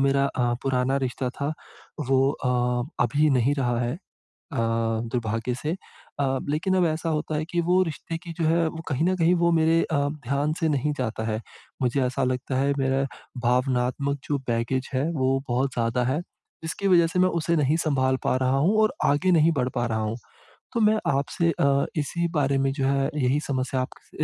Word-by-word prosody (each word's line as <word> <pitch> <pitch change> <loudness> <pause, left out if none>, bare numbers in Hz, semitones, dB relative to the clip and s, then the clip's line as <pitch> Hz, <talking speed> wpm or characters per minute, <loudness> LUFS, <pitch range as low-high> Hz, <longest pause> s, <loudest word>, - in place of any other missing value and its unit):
मेरा 140 0 +3
अ, 120 -3 0
पुराना 130 0 +1
रिश्ता 125 +1 -3
था 140 +4 -3 0.6
वो 135 0 +4
अ, 125 +2 0
अभी 150 +1 +2
नहीं 130 +1 +3
रहा 120 -3 +1
है 120 0 -1
अ, - - -6 0.7
दुर्भाग्य 115 +1 -1
से 150 +5 -3 0.5
अ, 135 -1 +1
लेकिन 180 +6 +1
अब 180 - +3
ऐसा 160 +1 -2
होता 155 0 -1
है 155 - -2
कि 175 -1 +1
वो 180 +2 +3
रिश्ते 165 0 -5
की 170 - -7
जो 165 - +1
है 165 0 +3
वो 160 0 -5
कहीं 145 +2 +1
न 185 +1 +2
कहीं 170 +1 +4
वो 170 - +4
मेरे 165 0 +3
अ, 160 - -2 0.3
ध्यान 140 +4 0
से 160 - +1
नहीं 150 0 0
जाता 110 -3 -2
है, 110 - -2 0.4
मुझे 130 +2 +1
ऐसा 130 +2 -1
लगता 130 +1 -1
है 140 +1 +2
मेरा 135 0 +1 0.4
भावनात्मक 125 +2 +1
जो 145 - +1
बैगेज 120 +3 -1
है, 130 +2 +1
वो 135 -3 +1
बहुत 130 +2 0
ज़्यादा 115 +1 0
है। 130 +5 0 0.4
जिसकी 180 +5 -2
वज़ह 175 -3 +5
से 175 +2 -1
मैं 185 0 +4
उसे 165 +2 +1
नहीं 150 -1 +2
सँभाल 130 -5 +1
पा - - +1
रहा 130 +1 +1
हूँ 170 +10 +3
और 215 - +3
आगे 160 +6 +3
नहीं 165 -1 +5
बढ़ 125 - +1
पा 120 -1 0
रहा 110 -1 -1
हूँ। 110 +1 -2 0.6
तो 235 - 0
मैं 215 0 +4
आपसे 165 +5 +1
अ, 140 0 +3
इसी 170 +3 -1
बारे 140 -2 +2
में 135 0 +1
जो 135 -1 -1
है 135 0 +1
यही 135 0 +2
समस्या 130 -1 -1
आपके 130 - -6
135 Hz, 200 wpm, -25 LUFS, 125-160 Hz, 0.7 s, वज़ह